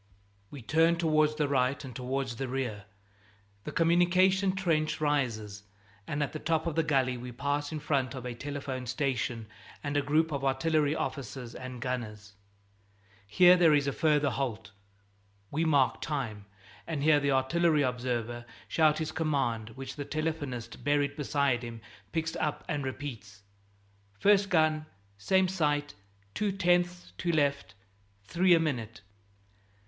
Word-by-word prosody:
We 140 -4 -10
turn 165 +6 +3
towards 155 -2 +2
the 150 -1 0
right 135 0 0
and 125 - -9
towards 130 -1 -3
the 135 - -3
rear. 125 -6 -3 0.8
The - - -4
communication 185 +3 +3
trench 165 -5 0
rises, 115 -9 -1 0.5
and 145 +1 -1
at 145 - -4
the 155 - -4
top 160 +1 0
of 165 - -1
the 165 - +2
gully 135 -5 +1
we 125 +1 -7
pass 145 +4 -2
in 155 - -3
front 140 -3 -1
of 130 -1 -7
a 125 - -4
telephone 135 -1 -5
station 125 -3 -2 0.4
and 145 -1 -3
a 145 - +3
group 155 +3 +1
of 140 -2 -3
artillery 145 +2 +1
officers 125 -5 -5
and 130 -1 -7
gunners. 105 -5 -5 0.9
Here 180 - +7
there 165 -4 +5
is 145 -1 +2
a 140 - 0
further 150 -2 +2
halt. 110 -6 -3 0.8
We 160 +3 0
mark 140 -6 +2
time, 115 -9 -3 0.4
and 155 -4 -2
hear 150 -1 +5
the 140 0 0
artillery 155 +3 +2
observer 120 -2 -2 0.2
shout 155 -2 +3
his 160 -1 -3
commands, 120 -8 -1
which 135 +2 -7
the 145 - -3
telephonist 150 -6 -4
buried 145 0 +1
beside 140 -4 0
him 115 -1 -7 0.3
picks 165 0 -2
up 150 -2 -2
and 150 -4 -2
repeats: 115 -7 -7 0.7
"First 200 - +4
gun, 155 -3 +2 0.3
same 190 - +3
sight; 150 - 0 0.4
two 210 -1 0
tenths 175 -1 +1
to 175 - 0
left; 140 -8 0 0.5
three 175 - +4
a - - +3
minute!" 120 -8 -3
145 Hz, 150 wpm, -29 LUFS, 125-160 Hz, 0.9 s, Here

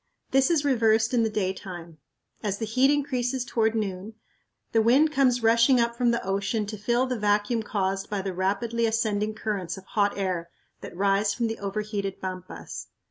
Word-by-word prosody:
This 270 0 +4
is 315 -4 +2
reversed 225 -3 +3
in 240 - +3
the 225 - +1
daytime. 185 -5 -4 0.4
As 200 -2 -2
the 220 - -3
heat 255 +5 +3
increases 265 -3 0
toward 225 -2 +1
noon, 205 0 -3 0.6
the 225 - +3
wind 270 +8 +4
comes 255 -4 +2
rushing 230 +3 +5
up 235 0 +1
from 240 0 +2
the 235 -4 0
ocean 200 +3 -1
to 210 +1 -6
fill 240 +4 +1
the 255 -3 -3
vacuum 210 +2 +1
caused 195 -2 -2
by 205 -2 -2
the 190 -1 -3
rapidly 220 +5 0
ascending 215 -1 0
currents 200 -5 -3
of 190 - -11
hot 205 0 0
air 185 -4 -2 0.3
that - - -10
rise 200 +1 +2
from 240 - -1
the 225 0 -3
overheated 200 -1 -3
pampas. 185 -1 -7
215 Hz, 180 wpm, -26 LUFS, 195-235 Hz, 0.6 s, rushing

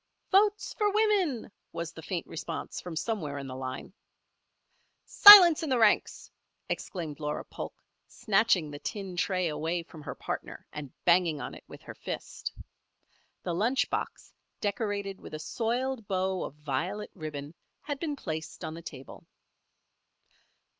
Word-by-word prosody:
"Votes 410 +2 +3
for 420 -2 +1
women!" 395 - +1 0.2
was 165 -1 -5
the 160 - -10
faint 175 +1 -4
response 165 0 -6
from 175 -2 -7
somewhere 160 -7 -2
in 140 - -5
the 130 -1 -7
line. 130 +6 -6 1.1
"Silence 370 -6 +10
in 320 - -3
the 260 - +2
ranks!" 220 -3 +2 0.4
exclaimed 160 -6 -4
Laura 150 -1 -3
Polk, - - -8 0.3
snatching 195 -8 +2
the 145 - -7
tin 195 0 -5
tray 180 +1 0
away 160 +3 -2
from 165 -2 -13
her 145 - -6
partner - - -6
and 150 -3 -7
banging 170 -3 +4
on - - -6
it - - -12
with - - -12
her - - -9
fist. - - -6 0.9
The 175 - -2
lunch 230 +9 +1
box, - - -4 0.3
decorated 200 -2 -2
with - - -8
a - - -6
soiled 235 - -2
bow 190 -1 -1
of - - -8
violet 150 +8 -3
ribbon, 150 -3 -7 0.3
had 290 -2 -4
been 300 -2 -2
placed 160 - -6
on 155 - -5
the 165 - -8
table. 135 -5 -11
185 Hz, 145 wpm, -29 LUFS, 155-230 Hz, 1.1 s, Silence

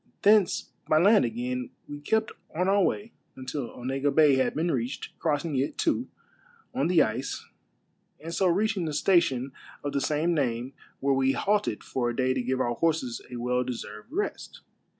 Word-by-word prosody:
Thence 205 -2 +4 0.2
by 155 - +5
land 200 - +6
again, 125 +2 -3 0.2
we 145 0 -7
kept 220 +8 +1 0.2
on 180 +3 +1
our 200 +1 +4
way 205 +4 0 0.2
until 130 -1 -5
Onega 135 +3 -2
Bay 150 -3 +6
had 130 -2 +1
been 165 +2 +1
reached, 125 0 -3
crossing 150 -1 0
it, 135 +3 -1
too, 290 -6 +1 0.7
on 140 - +1
the 170 -4 +5
ice, 125 +4 -3 0.7
and 165 +2 -7
so 190 +2 +2
reaching 195 +1 +1
the 155 - -3
station 145 -6 +2 0.3
of 145 - -3
the 140 - 0
same 155 +4 +1
name, 125 -3 -1 0.3
where 140 0 +2
we 135 0 +2
halted 205 - 0
for 120 -2 -1
a 120 - -3
day 130 0 +2
to 130 - -1
give 130 +1 -1
our 120 -2 +1
horses 150 -5 0
a 125 - -7
well 125 +1 0
deserved 115 - -7
rest. 405 +6 -4
145 Hz, 175 wpm, -27 LUFS, 125-175 Hz, 0.7 s, land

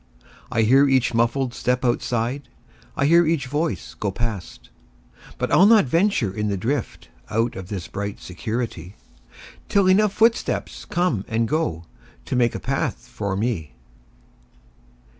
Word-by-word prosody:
I 115 -2 +2
hear 135 +6 +5
each 130 -3 +2
muffled 120 +2 +1
step 125 +1 -1
outside,I 120 +3 -3
hear 170 +4 +6
each 155 -5 +1
voice 150 +5 -2
go 105 - -3
past. 105 -3 -5 0.7
But - - -2
I'll 195 - +6
not 220 -4 +6
venture 165 - +1
in 105 +1 -2
the 100 -1 -1
driftOut 115 -1 -3
of 95 -1 -7
this 95 -4 -5
bright 100 0 -5
security, 90 0 -5 0.7
Till 200 -1 +3
enough 200 +2 +4
footsteps 230 +2 0
come 175 - 0
and 115 0 0
goTo 100 - -1 0.5
make 120 -2 +2
a - - -3
path - - -1
for 100 -2 -3
me. 95 - -2
120 Hz, 130 wpm, -23 LUFS, 105-145 Hz, 0.7 s, hear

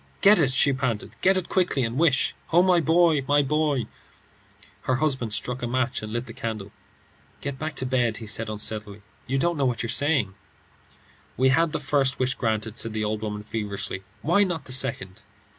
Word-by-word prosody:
"Get 205 0 +7
it," 145 -5 +3
she 140 +1 +3
panted; 130 -5 -2
"get 190 +1 +4
it 185 - -2
quickly, 180 -8 +1
and 115 0 -2
wish 145 -3 +2 0.2
Oh, 175 +2 +6
my 180 -2 +4
boy, 165 -2 +3
my 145 0 +4
boy!" 145 -3 +1 1.0
Her 130 - +2
husband 130 -5 0
struck 125 +4 -2
a 120 - -2
match 130 0 -1
and 110 0 -6
lit 120 +2 -2
the 115 - -9
candle. 110 -4 -5 0.7
"Get 140 -2 -5
back 155 0 -4
to 130 - 0
bed," 125 -4 +1
he 115 - -8
said, 110 +1 -2
unsteadily. 105 -1 -4 0.2
"You 135 - 0
don't 170 +4 +1
know 140 - +1
what 125 -2 0
you - - -2
are 115 - -2
saying." 140 -9 +1 1.0
"We 130 +1 +4
had 165 +4 +3
the - - -2
first 135 -3 +1
wish 130 0 +1
granted," 110 -1 -2
said 115 - -2
the 110 -1 -1
old 105 0 -2
woman, 105 -1 -4
feverishly; 105 -3 -4 0.2
"why 175 +6 +4
not 170 -7 -3
the - - -8
second?" 95 -7 -2
130 Hz, 200 wpm, -25 LUFS, 110-150 Hz, 1.0 s, Get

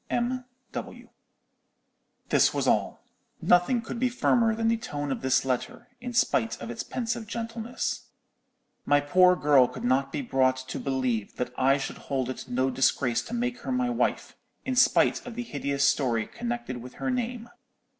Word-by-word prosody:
_ - - -45 0.7
M.W.' - - -7 1.2
"This - - +4
was - - 0
all. - - +1 0.4
Nothing 230 +7 +3
could 230 - -5
be 255 +1 +2
firmer 235 -2 +2
than 225 0 0
the 230 - +3
tone 145 -11 -4
of - - -3
this 130 0 +2
letter, 130 - -3
in 245 0 -5
spite 230 -1 +1
of 115 0 -6
its 120 - -4
pensive 235 -2 -3
gentleness. 230 +2 -4 0.8
My 145 0 +4
poor 180 +5 +5
girl 145 -6 +5
could - - -9
not 135 +2 +1
be 145 - -3
brought 130 0 +2
to 130 0 -6
believe 130 -6 -1
that 125 0 -3
I 135 +2 +3
should 135 - -5
hold 130 -2 0
it - - -7
no 130 +2 +1
disgrace 130 -1 +2
to 240 - -5
make 245 +1 -2
her - - -5
my 255 -1 +1
wife, 235 - -1 0.3
in 260 - -1
spite 250 - +4
of 245 -2 -8
the 245 - -3
hideous 140 - 0
story 115 -6 +1
connected 120 +1 -4
with 125 +1 -10
her 260 - -2
name. 240 -1 -3
145 Hz, 175 wpm, -27 LUFS, -, 1.2 s, poor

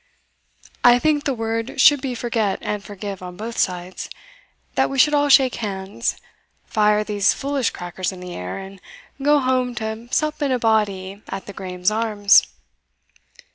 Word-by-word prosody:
I 245 0 +7
think 295 +2 +1
the 275 - +1
word 225 +2 -3
should 290 0 +6
be 260 -3 -3
forget 225 -4 -1
and 210 -1 -3
forgive 200 -1 -7
on 180 -1 -8
both 225 +3 -5
sides, 180 0 -2 0.6
that - - +2
we 275 - -4
should 300 +3 +5
all 290 0 +3
shake 265 -2 +5
hands, 200 +2 -3 0.5
fire 210 -1 +2
these 205 -1 +1
foolish 275 -3 -1
crackers 180 +1 -4
in 185 - -10
the 180 -1 -8
air, 90 0 -5
and 195 0 -10 0.4
go 295 +2 +4
home 255 -2 0
to 220 0 -5
sup 305 +3 -1
in 285 -2 +1
a 255 - +2
body 205 -4 0
at 195 0 -5
the 200 - -9
Graeme's 185 0 -2
Arms." 215 -2 +4
220 Hz, 165 wpm, -21 LUFS, 195-255 Hz, 0.6 s, I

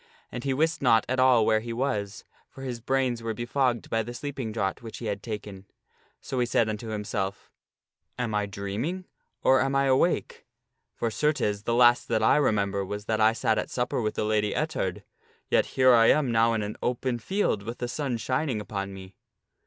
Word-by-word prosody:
And 120 - -6
he 135 - 0
wist 160 +4 +1
not 115 -5 +4
at 130 +1 -1
all 130 -4 +5
where 110 -1 +3
he 115 +2 -6
was, 110 -5 -2 0.3
for 135 - -11
his 125 -3 -4
brains 130 -1 0
were 115 -1 -3
befogged 120 +1 0
by 115 - +2
the 120 +2 -7
sleeping 130 -3 -4
draught 100 -3 -2
which 115 -2 -8
he 120 - -7
had 100 -2 -3
taken. 105 -3 -7 0.5
So 130 - -4
he 120 - +1
said 115 -1 +2
unto 110 +1 -4
himself, 105 -2 -4 0.3
" - - -53
Am 120 -3 -2
I 105 -1 0
dreaming, 105 - -4 0.4
or 130 0 +5
am 135 0 0
I 135 0 +3
awake? 135 +6 +1 0.5
for 115 - -2
certes, 110 -8 0
the 115 - +1
last 120 0 +5
that 110 -2 +1
I - - +5
remember 100 -8 +1
was 105 +2 -5
that 110 0 0
I 110 +1 +5
sat 110 -1 +1
at - - -4
supper 125 0 -1
with 110 -1 -2
the - - -1
Lady 105 -1 +1
Ettard, 150 - -2 0.5
yet - - +3
here 130 -1 +6
I 115 -1 +6
am 140 -4 +3
now 115 0 +3
in 110 -2 -1
an 105 +1 -5
open 125 0 -1
field 190 - 0
with 115 +4 -6
the 120 - -3
sun 130 -1 -2
shining 130 +1 -1
upon 100 -2 -5
me." 95 0 -11
115 Hz, 205 wpm, -27 LUFS, 105-130 Hz, 0.5 s, here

